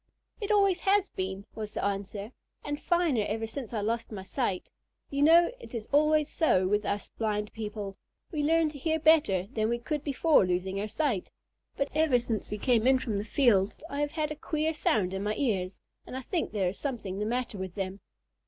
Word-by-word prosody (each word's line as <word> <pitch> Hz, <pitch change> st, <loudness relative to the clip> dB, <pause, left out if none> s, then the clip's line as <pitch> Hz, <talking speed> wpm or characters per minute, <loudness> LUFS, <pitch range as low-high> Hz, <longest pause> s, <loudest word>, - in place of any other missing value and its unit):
"It 410 Hz, -, -4 dB
always 395 Hz, -4 st, +4 dB
has 395 Hz, 0 st, +3 dB
been," 190 Hz, +1 st, -4 dB
was 215 Hz, -1 st, -6 dB
the -, -, -1 dB
answer, 200 Hz, +2 st, -3 dB, 0.3 s
"and 290 Hz, 0 st, -3 dB
finer 340 Hz, -9 st, +2 dB
than -, -, -1 dB
ever 225 Hz, 0 st, -3 dB
since 225 Hz, +1 st, -6 dB
I 220 Hz, -3 st, -2 dB
lost 230 Hz, +2 st, -2 dB
my 195 Hz, -3 st, -6 dB
sight. 195 Hz, -2 st, -2 dB, 0.4 s
You 280 Hz, 0 st, -1 dB
know 335 Hz, +5 st, +6 dB
it 465 Hz, -, -10 dB
is 225 Hz, -2 st, -4 dB
always 305 Hz, +1 st, +4 dB
so 190 Hz, -, +2 dB
with 210 Hz, +2 st, +1 dB
us 200 Hz, 0 st, -2 dB
blind 210 Hz, -1 st, -1 dB
people. 210 Hz, -3 st, -5 dB, 0.3 s
We 305 Hz, -4 st, -1 dB
learn 320 Hz, +1 st, +3 dB
to 295 Hz, -1 st, -10 dB
hear 320 Hz, +3 st, +1 dB
better 295 Hz, -, +4 dB
than 215 Hz, 0 st, +1 dB
we 235 Hz, -, +1 dB
could 295 Hz, +4 st, -3 dB
before 295 Hz, -1 st, +4 dB
losing 185 Hz, +2 st, -1 dB
our 210 Hz, -, -2 dB
sight. 240 Hz, -, -1 dB, 0.5 s
But 275 Hz, -, 0 dB
ever 305 Hz, -4 st, +4 dB
since 230 Hz, -4 st, -3 dB
we 210 Hz, -, -3 dB
came 235 Hz, +1 st, +2 dB
in 265 Hz, 0 st, +6 dB
from 220 Hz, -5 st, -2 dB
the -, -, -2 dB
field 210 Hz, -4 st, +3 dB, 0.2 s
I 285 Hz, +1 st, -2 dB
have 290 Hz, 0 st, -1 dB
had 305 Hz, -2 st, -1 dB
a -, -, -3 dB
queer 310 Hz, +1 st, -1 dB
sound 200 Hz, -10 st, +1 dB
in 195 Hz, -, -2 dB
my 210 Hz, +1 st, -1 dB
ears, 195 Hz, -8 st, -1 dB, 0.3 s
and 255 Hz, -, -5 dB
I -, -, -4 dB
think 345 Hz, -, -1 dB
there 195 Hz, -4 st, +1 dB
is 185 Hz, -, -7 dB
something 220 Hz, -9 st, -3 dB
the 210 Hz, -, -1 dB
matter 240 Hz, -3 st, -2 dB
with 190 Hz, -2 st, -5 dB
them." 195 Hz, -1 st, -3 dB
230 Hz, 215 wpm, -29 LUFS, 205-300 Hz, 0.5 s, know